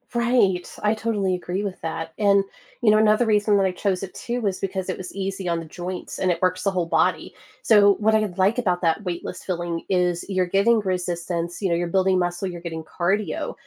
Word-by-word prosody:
Right, 235 -7 +2
I 210 +1 +2
totally 210 -4 0
agree 180 +2 -3
with 195 -2 -5
that 165 0 -4
and, 200 -2 +4 0.4
you 235 - +4
know 215 - +6
another 215 +2 +4
reason 210 -1 +3
that 195 - +3
I 190 - +1
chose 185 0 -1
it 195 -1 -7
too 245 +1 -3
was 195 -4 -1
because 190 -1 -3
it 185 - -2
was 185 - -8
easy 195 -1 -4
on 170 -1 0
the 165 - -7
joints 180 +3 -6
and 185 - +1
it 170 - -2
works 185 0 +1
the 195 - +2
whole 180 -3 -1
body. - - 0 0.3
So, 205 -2 +6
what 220 +1 +3
I 215 0 +3
like 195 +5 +3
about 180 -7 0
that 170 +4 +1
weightless 180 0 -5
filling 175 -2 -3
is 180 -2 +1
you're 185 -2 0
getting 205 +5 +3
resistance, 175 -2 -3
you 195 - 0
know, 170 - +2
you're 175 +1 -1
building 190 +1 +2
muscle, 175 +1 -1
you're 175 -2 -6
getting 165 -2 -5
cardio, 190 +6 -1
185 Hz, 220 wpm, -23 LUFS, 175-205 Hz, 0.4 s, know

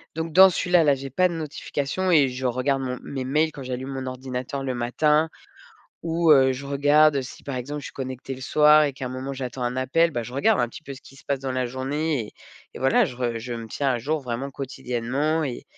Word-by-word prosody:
donc 160 0 -4
dans 190 +2 +9
celui-là, 180 -1 +3
là, 145 - +5
j'ai 135 +1 -7
pas 185 +8 +3
de - - -5
notification 155 +3 -3
et 145 -5 +5
je 130 +1 -5
regarde 130 +2 0
mon 125 -1 -4
mes 130 -2 -5
mails 155 +4 +1
quand 140 - -8
j'allume 130 +1 -5
mon 135 -1 -4
ordinateur 130 +1 -5
le 130 -2 -2
matin 150 +6 +2 0.8
ou, 165 0 +3
heu, 135 -2 +6
je 140 +2 -7
regarde, 145 +1 +4
si 125 - -10
par 140 - -5
exemple 145 +4 -5
je - - -9
suis - - -8
connectée 130 0 -6
le 130 - -12
soir 150 +2 +5
et 145 - -1
qu'à 130 0 -6
un - - -4
moment 130 +2 -5
j'attends 130 -1 -5
un 120 +1 -2
appel, 165 +6 +2
bah, 120 - -2
je 120 +2 -9
regarde 195 +11 +2
un 120 - +2
petit 155 - -11
peu 140 - -7
ce 130 - -11
qui 135 - -16
se - - -17
passe 140 -1 -1
dans 135 0 -3
la 130 0 0
journée 135 +1 -2
et - - -14 0.4
et - - -7
voilà, 135 +1 +3
je 125 - -7
re 120 -2 -2
je 120 +1 -6
me 115 -1 -6
tiens 140 +5 -2
à 120 - -1
jour 155 +6 -1
vraiment 125 +2 -4
quotidiennement 135 +3 -2
et 125 -3 -5
135 Hz, 245 wpm, -24 LUFS, 130-150 Hz, 0.8 s, dans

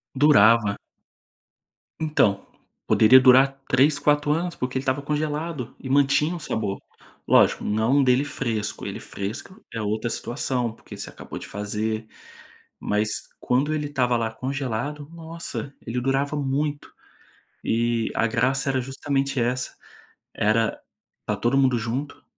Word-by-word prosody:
Durava. 115 -7 +5 1.2
Então, 135 -11 +1 0.4
poderia 130 +4 +7
durar 135 +1 +5
3, 140 +3 +4
4 145 0 +2
anos, 170 +3 0
porque 125 +1 -3
ele - - -1
estava 135 +1 0
congelado 150 -2 -3
e 130 - -7
mantinha 145 +4 +3
um - - -6
sabor. 110 -10 -3 0.5
Lógico, - - +4
não 115 +7 +2
dele 130 +2 +3
fresco, 110 -7 -3
ele - - -5
fresco 110 - -7
é 115 - -3
outra 110 +3 -1
situação, 120 -1 -2
porque - - -12
você - - -6
acabou - - -9
de - - -9
fazer, 110 +2 -3 0.7
mas 105 +1 0 0.3
quando 140 +5 +1
ele 150 -1 -2
estava 125 -4 +1
lá 115 -1 -1
congelado, 135 +3 -4
nossa, 165 -4 -7
ele 120 +2 -3
durava 135 +3 0
muito. 145 +1 -2 0.7
E 115 0 0
a 115 - +2
graça 130 +4 +1
era 130 - +1
justamente 135 +1 -2
essa, 125 +2 -1 0.6
era 110 +2 +1 0.4
estar - - -3
todo 120 +3 +2
mundo 130 -3 +3
junto, 130 +6 -4
130 Hz, 135 wpm, -24 LUFS, 115-145 Hz, 1.2 s, poderia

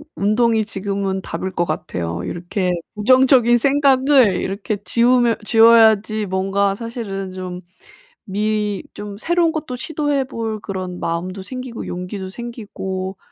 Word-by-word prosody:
운동이 220 +2 +2
지금은 195 -1 -3
답일 190 0 -4
것 175 - 0
같아요. 85 - -3
이렇게 180 +2 -2 0.2
부정적인 250 +2 +5
생각을 270 -4 +4
이렇게 200 +2 -3
지우면 240 0 +3
지워야지 220 -2 +5
뭔가 195 +1 0
사실은 205 -5 -5
좀 185 -1 -6 0.6
미리 210 0 -1
좀 205 -1 -7
새로운 340 +5 +1
것도 300 -6 -4
시도해 290 -1 -1
볼 225 -4 -4
그런 185 -3 -5
마음도 180 +3 -3
생기고 255 +2 -7
용기도 185 +2 -5
생기고 190 -4 -6
210 Hz, 290 characters per minute, -20 LUFS, 190-240 Hz, 0.6 s, 부정적인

